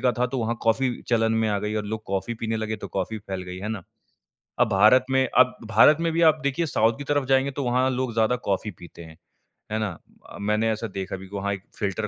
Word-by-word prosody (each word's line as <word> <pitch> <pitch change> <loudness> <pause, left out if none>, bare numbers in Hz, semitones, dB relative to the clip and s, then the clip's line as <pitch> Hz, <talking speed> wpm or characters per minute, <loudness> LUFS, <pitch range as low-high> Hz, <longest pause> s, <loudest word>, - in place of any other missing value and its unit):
का 125 -2 +2
था 125 - +2
तो 130 +2 -4
वहाँ 115 0 -1
कॉफ़ी 125 +3 +2 0.2
चलन 115 -1 +2
में 110 - +1
आ 105 -1 0
गई 105 +1 -3
और 105 - -2
लोग 110 +1 -4
कॉफ़ी 95 +4 -2
पीने 115 0 -1
लगे 110 0 -3
तो - - -8
कॉफ़ी 105 +3 -3
फैल 95 -2 -6
गई, 90 0 -7
है 105 +3 -5
ना? 110 -4 -4 0.8
अब - - +4
भारत 110 +6 +5
में 130 0 +3
अब 125 0 +5
भारत 115 +7 +7
में 165 -1 0
भी 170 - +1
आप 155 - -13
देखिए 140 +4 0
साउथ 115 -4 +1
की 145 - -6
तरफ 145 -2 0
जाएँगे 135 +1 +3
तो - - -1
वहाँ 125 +1 +2
लोग 130 -2 -2
ज़्यादा 115 +2 +2
कॉफ़ी 100 +2 -1
पीते 85 0 -12
हैं, 80 -1 -13 0.6
है 110 - 0
ना? 110 -2 -1 0.4
अ, - - -10
मैंने 105 +2 +1
ऐसा 110 +1 -3
देखा 95 0 -4
भी 95 0 -11
वहाँ 100 0 -2
एक 95 -1 -7 0.2
फ़िल्टर 105 +1 -2
110 Hz, 250 wpm, -25 LUFS, 100-125 Hz, 0.8 s, भारत